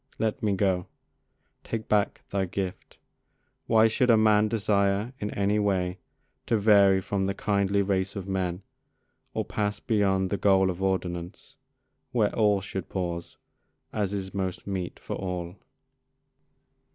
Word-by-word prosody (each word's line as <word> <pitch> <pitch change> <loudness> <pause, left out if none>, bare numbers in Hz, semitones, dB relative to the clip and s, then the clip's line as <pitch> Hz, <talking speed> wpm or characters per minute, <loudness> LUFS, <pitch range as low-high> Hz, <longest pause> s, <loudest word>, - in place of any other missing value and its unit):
Let 110 -1 -1
me 105 -2 +1
go: 95 -2 +1 0.8
take 110 -1 -4
back 105 -1 +1
thy 95 -1 0
gift: 95 0 -5 0.7
Why 110 -1 +5
should 125 +3 +1
a 115 - +7
man 110 -1 +4
desire 105 +1 +1
in 105 - -3
any 100 +1 +1
way 95 -3 0 0.5
To 115 - +3
vary 100 -2 +5
from 95 0 -1
the 100 - -2
kindly 100 0 +1
race 95 0 -1
of 100 -2 -5
men, 95 -1 -2 0.7
Or - - -1
pass 105 -1 -2
beyond 95 -4 +1
the 100 - +1
goal 95 -2 +4
of 90 +1 -8
ordinance 90 -1 -3 0.6
Where 110 -4 +2
all 105 -3 +3
should 95 -2 -6
pause, 85 -2 -4 0.6
as 105 -3 -1
is 95 -2 -4
most 95 -2 -3
meet 95 -3 -4
for - - -6
all? 90 -2 -4
100 Hz, 140 wpm, -27 LUFS, 95-105 Hz, 0.8 s, a